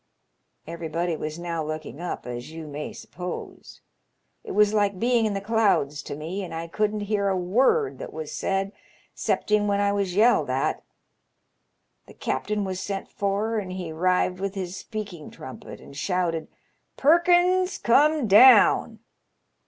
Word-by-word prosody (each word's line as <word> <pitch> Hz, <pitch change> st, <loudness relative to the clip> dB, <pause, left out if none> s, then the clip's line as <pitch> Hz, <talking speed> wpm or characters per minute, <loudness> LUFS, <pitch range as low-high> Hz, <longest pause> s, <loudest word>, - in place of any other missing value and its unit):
* -, -, -49 dB, 0.2 s
Every 170 Hz, 0 st, -6 dB
body 170 Hz, +2 st, -1 dB
was 155 Hz, 0 st, -5 dB
now 170 Hz, -2 st, -3 dB
looking 155 Hz, -1 st, -6 dB
up, 175 Hz, -, -5 dB
as 120 Hz, +1 st, -6 dB
you 160 Hz, 0 st, -8 dB
may 150 Hz, 0 st, -6 dB
suppose. 180 Hz, 0 st, -8 dB, 0.6 s
It 445 Hz, -, -6 dB
was 210 Hz, 0 st, +4 dB
like 205 Hz, -2 st, +1 dB
being 235 Hz, +1 st, +2 dB
in 205 Hz, -, -2 dB
the -, -, -1 dB
clouds 200 Hz, -9 st, +1 dB
to 145 Hz, -, -7 dB
me, 170 Hz, +7 st, -5 dB
and 175 Hz, -, -7 dB
I 165 Hz, +1 st, -4 dB
couldn't 210 Hz, +4 st, -1 dB
hear 205 Hz, -1 st, 0 dB
a 190 Hz, -, 0 dB
word 260 Hz, -, +2 dB
that -, -, -7 dB
was 155 Hz, -1 st, -6 dB
said, 195 Hz, 0 st, -1 dB, 0.4 s
'cepting 210 Hz, -1 st, 0 dB
when 200 Hz, 0 st, +1 dB
I 200 Hz, 0 st, +2 dB
was 200 Hz, -3 st, -1 dB
yelled 210 Hz, -, +4 dB
at. 130 Hz, +2 st, 0 dB, 1.3 s
The -, -, -15 dB
captain 210 Hz, +10 st, -2 dB
was 190 Hz, -1 st, -3 dB
sent 195 Hz, 0 st, -4 dB
for, 205 Hz, +3 st, -1 dB
and 190 Hz, -3 st, -6 dB
he 180 Hz, -3 st, -5 dB
'rived 180 Hz, +2 st, +1 dB
with 195 Hz, +1 st, -3 dB
his 185 Hz, -2 st, -4 dB
speak 215 Hz, -2 st, -6 dB
ing 155 Hz, -3 st, -10 dB
trumpet 130 Hz, -, -10 dB
and 140 Hz, -, -14 dB
shouted, 170 Hz, 0 st, -1 dB, 0.3 s
* -, -, -48 dB
Perkins, 355 Hz, +4 st, +4 dB
come 295 Hz, +4 st, +3 dB
down.' 230 Hz, +6 st, +6 dB
195 Hz, 165 wpm, -25 LUFS, 165-215 Hz, 1.3 s, down